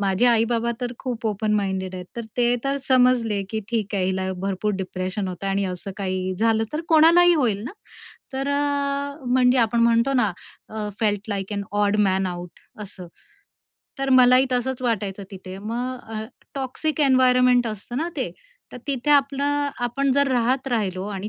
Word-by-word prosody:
माझे 195 +4 +2
आई-बाबा 235 0 +2
तर 245 0 -3
खूप 235 -3 -4
ओपन 215 0 -1
माइंडेड 190 -2 -2
आहेत. 180 - -6
तर 235 - -3
ते 240 0 +3
तर 275 +1 0
समजले, 245 -5 +3
की 220 -1 -2
ठीक 210 -3 -1
आहे 190 - +1
हिला 190 0 -1
भरपूर 200 +2 -1
डिप्रेशन 185 +1 -3
होतं 185 +2 -6
आणि 195 0 0
असं 185 +1 -5
काही 185 -1 -2
झालं 225 0 +2
तर 305 - -2
कोणालाही 340 +2 +6
होईल 225 -9 +1
ना. 255 - -5 0.6
तर 270 +1 -2
अ, 285 0 -1
म्हणजे 250 0 +3
आपण 235 0 +2
म्हणतो 235 +3 +3
ना 240 -6 +2 0.4
अ 210 -1 -3
felt 210 -1 0
like 200 0 -3
an 200 0 -2
odd 205 0 +2
man 190 0 +1
out 175 -1 -7 0.2
असं. 185 -3 -10 0.9
तर 270 0 -1
मलाही 255 0 +6
तसंच 255 +1 -1
वाटायचं 205 -5 -2
तिथे. 190 0 -9
मग 245 +5 -4 0.2
अ 215 - -4 0.3
टॉक्सिक 280 +4 -2
एन्व्हायर्नमेंट 250 -3 +4
असतं 215 +2 -6
ना 325 +5 -1
ते. 260 - -2 0.4
तर - - -8
तिथे 275 0 -1
आपलं 285 0 +2
आपण 275 +3 0
जर 280 0 +3
राहत 255 +2 +1
राहिलो 195 -6 -1
आणि 200 0 -5
235 Hz, 170 wpm, -23 LUFS, 200-260 Hz, 0.9 s, कोणालाही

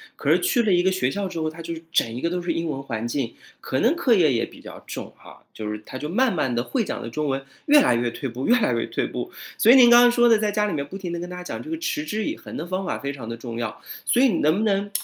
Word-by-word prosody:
可 - - -3
是 - - +5
去 340 -10 +2
了 215 -4 +1
一 175 0 +3
个 190 - +3
学 185 -9 0
校 200 +5 -3
之 170 - -5
后， 155 0 -1
他 165 +1 -10
就 165 - -4 0.2
整 115 -9 +1
一 125 - -5
个 170 - 0
都 180 0 -2
是 175 -1 -2
英 165 -1 -2
文 135 -1 -4
环 115 -2 -4
境， 120 -2 -2 0.3
可 130 - -2
能 255 +9 +3
课 265 -8 +3
业 165 -9 +4
也 115 - 0
比 - - -15
较 - - -10
重 - - -7
哈， - - -16
就 105 -1 -5
是 105 0 -6
他 130 - -8
就 150 - -5
慢 250 +6 +2
慢 130 -6 0
地 120 - 0
会 240 - -1
讲 - - -4
的 115 - -6
中 150 +5 -3
文 135 -1 -1 0.2
越 295 0 +7
来 120 - +3
越 120 0 0
退 135 +2 -5
步， 125 +3 -5
越 245 - +5
来 125 - +1
越 115 - 0
退 - - -2
步。 - - -5 0.3
所 230 - +6
以 - - +8
您 245 -2 +8
刚 240 0 +8
刚 245 - +6
说 240 0 +4
的 225 - +6
在 210 -1 0
家 210 0 +1
里 - - -2
面 140 -1 -2
不 195 - -10
停 185 -3 -5
地 170 - -3
跟 175 - -5
大 180 - -8
家 180 - -7
讲 - - -6
这 315 - -8
个 325 - -2
“持 310 -2 -2
之 215 -5 -2
以 305 - -3
恒” - - -10
的 165 - -5
方 185 +1 -3
法 - - -3
非 140 0 -3
常 125 -5 -8
的 115 - -4
重 115 0 -7
要。 115 -2 -4 0.2
所 245 - +3
以 270 - +6
你 195 - +1
能 155 +3 +3
不 215 - 0
能 200 -1 0
175 Hz, 360 characters per minute, -23 LUFS, 135-220 Hz, 0.3 s, 以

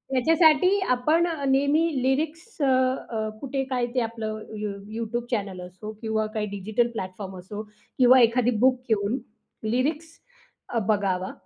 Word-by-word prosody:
याच्यासाठी 320 +7 +4
आपण 305 +8 +3
अ, 315 -5 -3
नेहमी 280 +4 +3 0.2
लिरिक्स 315 - -1
अ, - - +3 0.4
अ, 220 -2 -2
कुठे, 270 0 -2
काय 250 -2 0
ते - - +3
आपलं 220 -1 -4 0.2
यु 210 -1 -3 0.3
YouTube 235 +1 -3
चॅनेल 200 -5 -2
असो 185 +4 -8
किंवा 220 -1 0
काही 210 -1 0
डिजिटल 210 +4 0
प्लॅटफॉर्म 190 -2 -6
असो 200 +4 -7 0.4
किंवा 255 0 +7
एखादी 240 +1 +3
बुक 260 -1 +4
घेऊन 215 +3 +1 0.5
लिरिक्स 280 +8 0 0.6
अ, 235 - 0
बघावा 195 -3 0
235 Hz, 140 wpm, -25 LUFS, 210-275 Hz, 0.6 s, किंवा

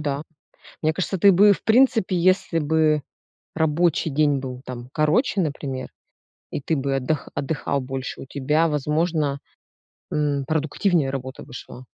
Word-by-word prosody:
да. 145 -1 -2 0.6
Мне 155 0 +2
кажется 190 +2 -2
ты 200 +3 +6
бы 205 +3 +6
и - - +7
в - - -9
принципе, 225 -5 +3
если 180 -1 +2
бы 155 0 +2 0.5
рабочий 160 +1 +1
день 145 -1 +2
был 130 -1 -6
там 125 -1 -7
короче, 170 - +2
например, 140 -5 -4 0.6
и - - -3
ты 155 +4 -1
бы 135 0 -1
отдых 135 +3 -2
отдыхал 140 -1 -2
больше, 130 0 -5
у - - -9
тебя 150 +5 +1
возможно, 150 -1 0 0.7
м, 145 -2 0
продуктивнее 155 0 +1
работа 130 -1 -6
бы - - -15
шла. 125 +1 -10
150 Hz, 150 wpm, -23 LUFS, 135-165 Hz, 0.7 s, и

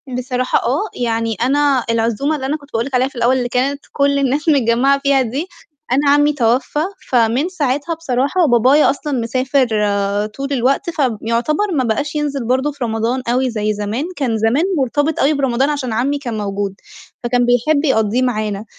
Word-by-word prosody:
بصراحة 255 0 -1
آه، 295 - -1 0.2
يعني 225 -1 -1
أنا 275 0 +2
العزومة 230 +6 0
اللي 265 -3 -5
أنا 290 +3 -1
كنت 285 -1 -18
باقول 230 +1 0
لِك 270 -1 -3
عليها 255 +1 +2
في 275 - -13
الأول 240 +2 +2
اللي 245 -1 -2
كانت 275 +3 -1
كل 280 0 +1
الناس 280 +4 0
متجمعة 270 0 +3
فيها 275 -1 +2
دي، 265 +8 -3 0.4
أنا 280 +3 +2
عمي 290 +1 +4
توفى 255 +2 0 0.3
فمن 245 +6 +2
ساعتها 295 -1 -1
بصراحة 300 +3 0
بابايا 255 +5 +4
أصلًا 285 +1 -3
مسافر 255 +3 +1 0.2
آآ 200 0 0
طول 275 +6 -5
الوقت، 270 +7 +1
فيعتبر 265 - -1
ما 270 -5 +1
بقاش 290 +6 -2
ينزل 285 -4 -2
برضه 260 +4 +1
في 285 -3 -6
رمضان 230 +3 -1
أوي 255 +2 +1
زي 215 -2 -1
زمان، 210 +7 -3
كان 250 -7 -1
زمن 225 +7 +2 0.2
مرتبط 290 +4 0
أوي 290 +3 +3
برمضان 270 -1 +1
عشان 275 -6 -2
عمي 265 +6 0
كان 240 -6 -5
موجود، 200 -1 -3 0.5
فكان 245 0 +1
بيحب 265 +5 +2
يقضّيه 220 -3 +1
معانا، 215 -4 -2
255 Hz, 175 wpm, -17 LUFS, 230-285 Hz, 0.5 s, عمي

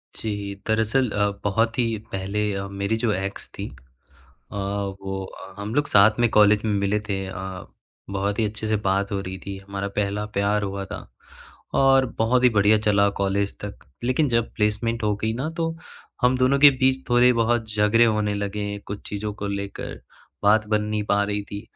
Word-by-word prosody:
जी। 100 -2 -4
दरअसल 110 +3 +2
अ, 105 0 +1
बहुत 115 +4 +1
ही 115 -2 +1
पहले 100 +2 -1
अ, 100 0 -3
मेरी 100 +3 -2
जो 115 -1 +1
एक्स 95 +1 -4
थीं - - -4 0.8
अ, - - -7 0.5
वो 95 0 -4
अ, 95 0 -11
हम 105 +2 -4
लोग 145 +1 +2
साथ 110 +3 +5
में 120 -1 +4
कॉलेज 105 0 +5
में 105 - +1
मिले 100 +2 +1
थे 95 -1 -1
अ, 95 -1 -6 0.4
बहुत 100 +1 -1
ही 110 - +3
अच्छे 110 +1 -4
से 110 - +2
बात 100 +1 +1
हो 100 - -1
रही 95 0 -6
थी 100 -1 -5
हमारा 100 0 -5
पहला 105 +1 0
प्यार 105 +1 +2
हुआ 100 0 -3
था। - - -8 0.7
और 135 -1 +5
बहुत 125 +3 +3
ही 125 - +7
बढ़िया 105 -1 +4
चला 100 -1 +3
कॉलेज 100 0 0
तक, 105 -1 -7 0.3
लेकिन 130 +5 +2
जब 115 -1 0
प्लेसमेंट 115 +2 0
हो 105 -1 +2
गई 110 +1 -1
ना, 135 +7 -2
तो 165 0 -2 0.5
हम 125 +1 +3
दोनों 130 +2 +3
के 145 0 +10
बीच 130 0 +1
थोड़े-बहुत 120 -1 +3
झगड़े 105 +2 +4
होने 105 -2 +1
लगे, 100 0 -3
कुछ 100 0 -6
चीज़ों 105 +1 -3
को 100 0 -5
लेकर 100 0 -5 0.4
बात 105 +1 +4
बन 105 0 +1
नहीं 105 0 -2
पा 100 0 +2
रही 105 0 -1
थी। 100 - -5
105 Hz, 190 wpm, -24 LUFS, 100-115 Hz, 0.8 s, के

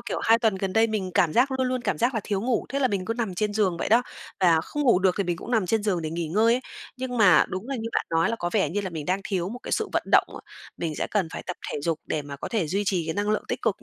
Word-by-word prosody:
kiểu, - - -4
2 225 +1 +5
tuần 220 -4 +2
gần 190 0 -3
đây 225 +2 +4
mình 205 -4 -2
cảm 160 -3 +3
giác, 255 +3 +3
luôn 260 -1 0
luôn 255 0 -1
cảm - - -1
giác 240 +2 +1
là 220 - 0
thiếu 200 -2 -1
ngủ, 235 -1 0
thế 275 - -2
là 260 - +2
mình 195 -4 -2
cứ 230 - -2
nằm 225 -6 -3
trên 210 +3 -1
giường 195 -5 +1
vậy - - -2
đó, 230 +3 +5 0.4
và 165 -3 +5
không 295 - -4
ngủ 240 -9 +5
được 190 -1 +2
thì 200 - +1
mình 175 -1 -1
cũng 235 - -9
nằm 220 -6 +2
trên 220 +2 +1
giường 185 -5 0
để 155 - -3
nghỉ 170 0 -3
ngơi 225 +7 +3
ấy. 255 - -1 0.4
Nhưng 255 -1 -4
mà 200 -6 +6
đúng 185 +7 -5
là 275 - -2
như 230 -1 -4
bạn - - 0
nói 165 0 +2
là 230 - -1
có 175 -4 -3
vẻ 190 -9 +2
như 205 +3 -1
là 190 -2 -4
mình 155 -3 -6
đang 185 +2 0
thiếu 185 -2 -1
một 245 +3 -7
cái - - -6
sự - - 0
vận - - +1
động - - +6
á, - - -9 0.4
mình 160 -3 -3
sẽ - - -1
cần 195 -6 0
phải - - -6
tập 180 - -4 0.2
thể 145 - -3
dục 160 +1 -1
để 150 - -2
mà 140 -1 -8
có - - -6
thể 210 -9 0
duy 195 +6 -1
trì 180 -4 +1
cái 160 - -2
năng 205 +1 0
lượng 215 - 0
tích - - -3
cực - - -1
200 Hz, 335 wpm, -25 LUFS, 175-230 Hz, 0.4 s, mà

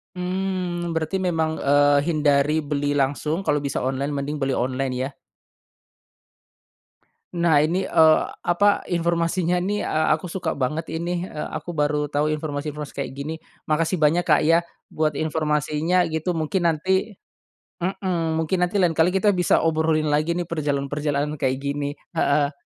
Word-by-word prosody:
Mmm, 180 -2 -2
berarti 160 +4 -1
memang, 160 -4 0
eee, 145 0 +4
hindari 150 -1 +2
beli 145 0 -1
langsung, 145 +5 0
kalo 150 -5 +1
bisa 140 -1 -3
online 135 +2 -2
mending 145 +2 -3
beli 135 -2 0
online 130 +1 -1
ya. 130 +2 -2 2.2
Nah, 170 -4 +3
ini, 180 +5 0
eee, 160 -1 +5 0.2
apa, 200 +4 +2
informasinya 170 +1 +1
nih, 205 +2 -1
eee, 155 0 +1
aku 160 +4 -1
suka 180 +2 -2
banget 150 +4 -2
inih. 170 +2 -2
Eee, 155 -5 -5
aku 175 - -5
baru 150 -1 0
tau 145 +1 +1
informasi-informasi 150 -1 -4
kayak, 135 - -4
gini. 150 +3 -4 0.3
Makasih 165 +4 0
banyak 160 +3 +2
Kak, 150 -3 +4
ya 165 +2 +5 0.3
buat 155 -2 0
informasinya, 155 +3 +1
gitu, 165 +2 -2
mungkin 170 +2 0
nanti 190 +6 0 0.6
mmm, 175 -3 -1
mungkin 160 +3 0
nanti 180 +3 0
lain 180 -4 +3
kali 160 +2 +3
kita 195 +2 +2
bisa 180 -2 +2
obrolin 160 -1 +1
lagi 155 +3 +1
nih, 175 - -1
perjalanan-perjalanan, 145 -1 -1
kayak 130 -2 +1
gini. 140 +1 -2 0.2
Heeh. 145 -2 +1
155 Hz, 145 wpm, -23 LUFS, 145-175 Hz, 2.2 s, eee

